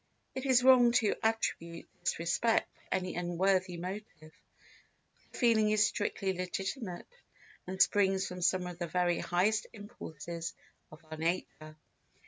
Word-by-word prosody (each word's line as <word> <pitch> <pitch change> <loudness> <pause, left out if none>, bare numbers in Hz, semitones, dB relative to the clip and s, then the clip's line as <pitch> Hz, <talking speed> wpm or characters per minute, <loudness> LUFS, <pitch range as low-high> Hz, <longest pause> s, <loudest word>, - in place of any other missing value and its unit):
It 265 +1 -4
is 250 -2 +5
wrong 250 -2 +7
to 225 -4 +3
attribute 170 -7 -1
this 175 - -1
respect 175 +7 +1
to - - -5
any 185 -1 -3
unworthy 180 +1 0
motive, 190 +5 -5 0.2
for 165 - -30
the - - -10
feeling 225 -4 +4
is 215 0 +4
strictly 195 -2 -1
legitimate 185 +2 -4 0.6
and 190 +1 -5
springs 195 -1 +3
from 180 -1 -6
some 180 +1 +2
of 175 -1 -7
the 175 - -2
very 175 0 +1
highest 200 +5 +1
impulses 170 -6 -7 0.4
of 155 +1 -15
our 155 - -5
nature. 155 -2 -3
185 Hz, 140 wpm, -32 LUFS, 175-215 Hz, 0.6 s, wrong